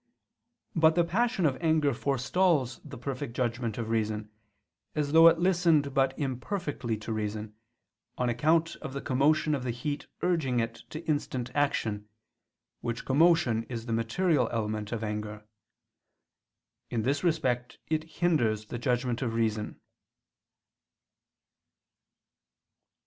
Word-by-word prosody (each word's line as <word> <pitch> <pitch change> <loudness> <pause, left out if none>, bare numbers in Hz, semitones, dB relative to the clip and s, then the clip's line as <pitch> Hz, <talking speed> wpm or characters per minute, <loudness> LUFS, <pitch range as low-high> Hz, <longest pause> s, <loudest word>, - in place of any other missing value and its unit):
But 160 0 +5
the 175 - +4
passion 210 +2 +1
of 135 -3 +2
anger 155 -4 +3
forestalls 135 +2 +1
the 140 -4 -9
perfect 125 0 -5
judgment 120 -3 -1
of 115 -2 -3
reason, 110 -1 -1 0.6
as 150 -2 0
though 165 +1 +8
it 165 0 +6
listened 170 -5 +3
but 135 -1 +2
imperfectly 135 - -3
to 110 +1 -5
reason, 105 0 -3 0.6
on 125 - 0
account 155 +7 +2
of 130 - -7
the 140 - -4
commotion 150 +3 +2
of 135 -3 -1
the 125 - -3
heat 145 +5 -3 0.2
urging 160 -9 +1 0.3
to 155 +2 -7
instant 130 -5 -2
action, 110 -8 0 0.7
which 120 0 -4
commotion 140 -5 +4
is 115 -2 -5
the 115 - -2
material 125 +4 +1
element 110 -2 -2
of 115 -2 -3
anger. 105 0 -4 1.4
In 115 -2 -1
this 140 +6 0
respect 125 -8 0
it 155 -1 0
hinders 150 -10 +1
the 120 - -6
judgment 125 -1 0
of 115 -3 -1
reason. 110 -2 -1
130 Hz, 125 wpm, -29 LUFS, 115-155 Hz, 1.4 s, though